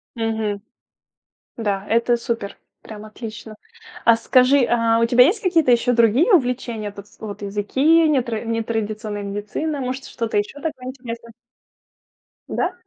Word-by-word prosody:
Мгм. 220 -3 -2 1.0
Да, 205 -3 -2
это 235 +2 +2
супер, 230 -3 -4 0.2
прям 215 -1 -10
отлично. 215 0 -9 0.5
А 230 - +6
скажи, 255 +3 +4
а 230 -1 +2
у - - +4
тебя 245 +1 +6
есть 395 - +1
какие-то 335 -7 +3
еще 245 +1 +3
другие 235 - +4
увлечения? 245 - 0
Потс 200 0 -14
вот 210 -1 -7
языки, 265 +11 +2
нетра 245 -7 0
нетрадиционная 220 -2 -3
медицина, 210 +10 -4
может, 260 +1 -4
что-то 230 -3 -2
еще 210 +8 -3
такое 290 -6 -5
интересное? 235 -3 -8 1.2
Да. 365 - -1
230 Hz, 130 wpm, -21 LUFS, 215-255 Hz, 1.2 s, А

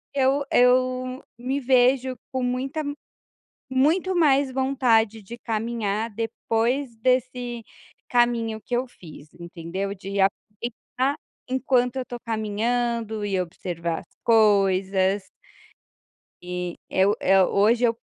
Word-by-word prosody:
eu 275 +1 +2
eu 255 +1 +2
me 260 +3 -2
vejo 260 0 +3 0.2
com 260 - -2
muita 255 +4 -2 0.9
muito 320 +9 +2
mais 280 -5 +3
vontade 245 -5 +2
de 235 +5 -9
caminhar 225 -2 -2
depois 230 +3 -1
desse 245 -1 0 0.5
caminho 235 -3 +1
que 245 - -3
eu 250 +2 -1
fiz, 155 -9 -14
entendeu. 170 +3 -5
De 195 +1 -5
aproveitar 235 +7 -1 0.3
enquanto 255 -1 +1
eu 260 - -2
estou 245 -1 -8
caminhando 225 0 -1
e 195 -2 0
observar 170 -1 -3
as - - -24
coisas 195 -3 +3 1.2
e 180 -1 -4
eu 195 +2 +3
eu 190 -1 +4
hoje, 225 +4 +3
eu 230 -1 +2
235 Hz, 110 wpm, -24 LUFS, 200-255 Hz, 1.2 s, eu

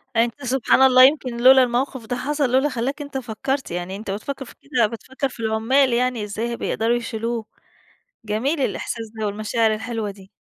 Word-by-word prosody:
يعني 230 +1 +5
أنت- 240 +4 -9
سبحان 260 +1 +2
الله- 255 -1 +7
يمكِن 265 -4 -2
لولا 260 0 +8
الموقف 250 0 -2
ده 245 +2 -3
حصل 280 +1 -1
لولا 265 +3 +3
خلّاك 270 +3 -3
أنت 285 -2 -5
فكّرت 260 +2 -3
يعني 175 +2 -4
أنت 200 0 -6
بتفكر 270 +7 -5
في - - -14
كده، 250 -6 +1
بتفكر 260 +5 -4
في 245 - -14
العمال 230 +4 +2
يعني، 245 -2 0
إزاي 210 +2 -4
هيبقوا 235 - -4
بيقدَروا 230 +2 +1
يشيلوه. 230 -1 -3 0.8
جميل 240 +9 -1
الإحساس 230 -4 -3
ده، 215 - 0
والمشاعر 215 +2 0
الحلوة 220 -1 -4
دي. 195 -1 -14
240 Hz, 185 wpm, -22 LUFS, 220-265 Hz, 0.8 s, لولا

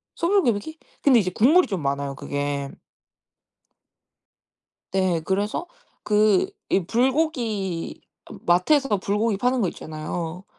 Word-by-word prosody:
소불고기? 315 - +1 0.2
근데 265 -5 +5
이제 185 -3 -1
국물이 305 - +4
좀 190 -6 -3
많아요 140 0 -2
그게. 145 0 -3 2.2
네. 185 -3 +1
그래서 205 - -1 0.4
그 210 -2 +3 0.2
이 190 - +2
불고기 235 - -1 0.3
어 - - -8
마트에서 205 - +3
불고기 205 +2 0
파는 250 +3 +1
거 185 - +1
있잖아요. 160 +3 -6
200 Hz, 230 characters per minute, -24 LUFS, 175-250 Hz, 2.2 s, 근데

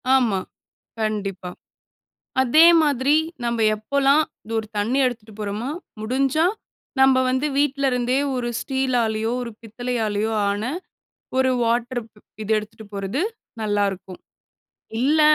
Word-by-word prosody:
ஆமா. 230 -7 +2 0.6
கண்டிப்பா. 200 -4 -2 0.9
அதே 305 +6 +6 0.2
மாதிரி 285 -1 +2 0.3
நம்ம 235 0 0 0.2
எப்போலாம் 280 +7 +3 0.2
இது 225 - -8
ஒரு 220 - -3
தண்ணி 230 +6 +1
எடுத்துட்டு 225 -3 -5
போறோமா, 210 +5 -3 0.3
முடிஞ்சா 270 +7 +1 0.6
நம்ம 265 0 +6
வந்து 260 +3 +1
வீட்ல 280 -1 +1
இருந்தே 250 +1 +1 0.2
ஒரு 245 -1 -2
ஸ்டீலாலேயோ, 240 -5 0
ஒரு 240 - -5
பித்தளையாலேயோ 225 -2 -2 0.2
ஆன 205 +1 -2 0.8
ஒரு 260 0 +4
வாட்டர் 240 +2 0
ப் 210 - -22 0.2
இது 215 - -3
எடுத்துட்டு 215 +1 -7
போறது 200 - -2 0.4
நல்லாருக்கும். 200 -3 -1 0.8
இல்ல 295 +5 +3
235 Hz, 115 wpm, -23 LUFS, 215-265 Hz, 0.9 s, அதே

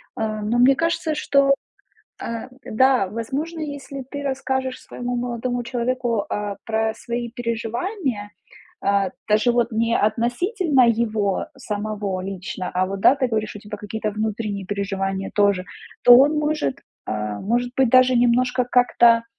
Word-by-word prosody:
А, 215 -1 -2
но 225 +3 0
мне 265 +2 +6
кажется, 330 0 0
что, 275 -1 +3 0.7
э, 230 +2 -5 0.2
да, 255 -3 +3
возможно, 275 - -4
если 285 -2 -6
ты 285 -1 -5
расскажешь 265 -1 -2
своему 245 0 -5
молодому 245 0 -2
человеку, 240 -3 -1
а, 205 -1 -3
про 220 0 0
свои 235 -1 -4
переживания, 235 - -3 0.5
а, 200 -1 +1 0.2
даже 215 +3 +3
вот 240 0 +1
не 230 +1 +1
относительно 250 - +2
его 215 -4 0
самого 210 -5 -3
лично, 185 -1 -5
а 185 +1 +1
вот 195 +1 -5
да, 260 - +6
ты 265 -2 +1
говоришь 215 -2 -2
у - - -7
тебя 210 +1 -8
какие-то 210 0 -4
внутренние 210 -2 -3
переживания 195 -1 -2
тоже, 200 -3 +3 0.4
то 245 - +10
он 290 +4 +5
может, 300 - -1 0.3
а, 105 -1 -3
может 240 +4 -1
быть, 265 -2 +4
даже 255 0 +6
немножко 245 +1 +3
как-то 235 -2 +4
235 Hz, 140 wpm, -22 LUFS, 210-255 Hz, 0.7 s, то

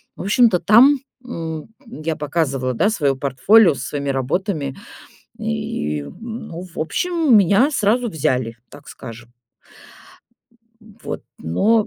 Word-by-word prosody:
в - - -7
общем-то, 210 -1 +4
там, 260 +7 +6 0.3
м, 165 -9 -6 0.2
я 165 -9 -4
показывала, 140 -4 -1
да, 180 - +2
свое 145 -10 +1
портфолио 145 - +4
со 125 - -7
своими 140 -1 -3
работами, 140 +2 -2 0.6
и, 75 0 -3
м, 220 - -8
ну, 170 +1 -7
в 180 -2 -15
общем, 325 - +1
меня 205 - +4
сразу 240 -1 +1
взяли, 130 - -1
так 145 - -15
скажем. 120 -1 -11 1.5
Вот, 220 0 -8 0.2
но 205 - +2
165 Hz, 120 wpm, -20 LUFS, 135-220 Hz, 1.5 s, там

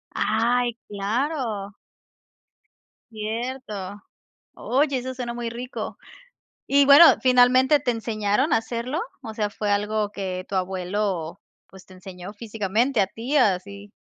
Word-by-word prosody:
Ay, 235 +2 +1
claro. 215 -1 -3 1.3
Cierto. 215 -3 -5 0.5
Oye, 275 +1 0
eso 260 +1 -5
suena 245 -2 -4
muy 235 -1 -4
rico, 245 +2 -6 0.7
y 280 0 +4
bueno, 285 +4 +10 0.2
¿finalmente 255 +3 +5
te 260 -3 -1
enseñaron 225 +4 0
a - - +5
hacerlo?, 235 +6 -3 0.2
o 220 - -7
sea, 210 -1 -1
¿fue 205 0 -3
algo 210 0 0
que 185 -3 -5
tu 195 - -3
abuelo, 185 -2 -2 0.3
pues, 190 -1 -15
te 185 - -15
enseñó 185 +1 -10
físicamente 220 +3 -1
a 190 - +3
ti?, 235 +9 -3
así. 200 0 0
220 Hz, 125 wpm, -24 LUFS, 200-250 Hz, 1.3 s, bueno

